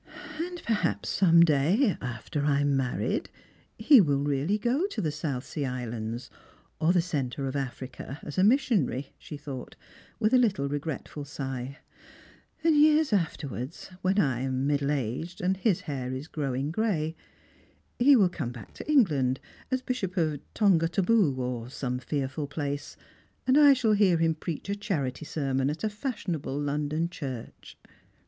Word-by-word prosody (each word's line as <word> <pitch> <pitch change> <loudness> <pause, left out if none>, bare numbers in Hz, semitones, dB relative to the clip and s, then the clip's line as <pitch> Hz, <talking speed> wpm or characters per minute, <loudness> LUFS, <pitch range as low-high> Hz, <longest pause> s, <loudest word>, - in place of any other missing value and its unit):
" 305 0 -10
And 350 +1 -4
perhaps 220 -2 0
some 170 -3 +5
day, 170 - +3
after 125 +4 -4
I 145 -1 +2
am 145 -1 +2
married, 130 -2 -1 0.5
he 240 +3 +7
will 140 -5 +1
really 145 +8 +1
go 255 - +1
to 400 - -5
the 155 - 0
South 145 -4 -3
Sea 145 -3 -3
Islands, 120 -1 -4 0.5
or 160 +1 +3
the 175 -2 +3
centre 140 -5 -2
of 135 +1 -3
Africa, 130 0 -5
as 150 - -4
a - - +5
mis 250 +8 +5
sionary," 145 - 0
she 150 - -8
thought, 140 -3 -7 0.4
with 215 +3 +2
a 255 - +7
little 190 - +2
regretful 145 0 -4
sigh; 135 -1 -5 0.4
" 320 - -28
and 325 -1 +4
years 305 -2 +5
afterwards, 150 - -3
when 190 +2 +1
I 135 - +2
am 130 0 -1
middle 140 -1 +1
aged 145 +5 -2
and 185 +2 +1
his 190 -1 +1
hair 130 -4 -4
is 130 +4 -5
growing 140 -1 -2
gray, 165 -6 0 0.8
he 275 +3 +7
will 205 -7 +5
come 150 -8 -4
back 120 -2 -11
to 305 - -5
England 145 - +3 0.3
as 260 0 -1
Bishop 205 -7 -3
of 155 -4 +1 0.2
Tongataboo, 180 - +3
or 125 -2 -3
some 125 -1 -3
fearful 140 +2 -3
place, 145 0 -4 0.5
and 260 - +4
I 290 -1 +8
shall 230 -5 +2
hear 200 -4 +4
him 165 0 +2
preach 160 +2 -5
a 200 - 0
charity 155 - -3
sermon 135 -3 0
at 150 +6 -4
a 215 - +1
fashionable 200 - -3
London 150 +3 -1
church." 135 -9 -8
150 Hz, 165 wpm, -28 LUFS, 135-200 Hz, 0.8 s, I